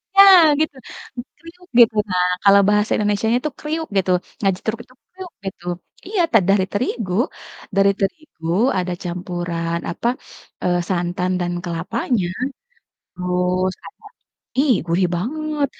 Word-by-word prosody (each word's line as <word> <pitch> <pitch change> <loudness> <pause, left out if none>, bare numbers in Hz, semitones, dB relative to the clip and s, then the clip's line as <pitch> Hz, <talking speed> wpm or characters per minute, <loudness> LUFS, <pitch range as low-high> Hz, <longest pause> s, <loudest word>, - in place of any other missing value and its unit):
Ya, 395 - +9 0.4
gitu! 310 -2 0 0.6
Kriuk, 350 +2 -15
gitu, 225 -2 +7
nah, 180 0 +2 0.2
kalau 200 0 +7
bahasa 210 0 +2
Indonesianya 210 +3 +1
itu 305 0 -2
"kriuk" 315 +1 -3
gitu, 185 -1 +2 0.3
ngajetruk, 200 +3 0
itu 255 - -23 0.2
kriuk 370 -1 -9
gitu 180 -2 -7 0.4
iya, 400 -3 0
ta 225 - +6
dari 195 -1 +4
terigu 215 -3 -2 0.6
dari 195 0 +5
terigu 195 - -4 0.3
ada 180 0 -2
campuran, 175 -1 -3
apa, 200 +7 -3 0.6
eee, 175 0 +2
santan 180 0 -1
dan 175 0 -1
kelapanya, 180 +4 -1 0.9
terus 180 +1 0
ada - - -14 0.6
ih, 275 -5 +4
gurih 175 +2 +2
banget, 300 - -2
195 Hz, 125 wpm, -20 LUFS, 180-255 Hz, 0.9 s, Ya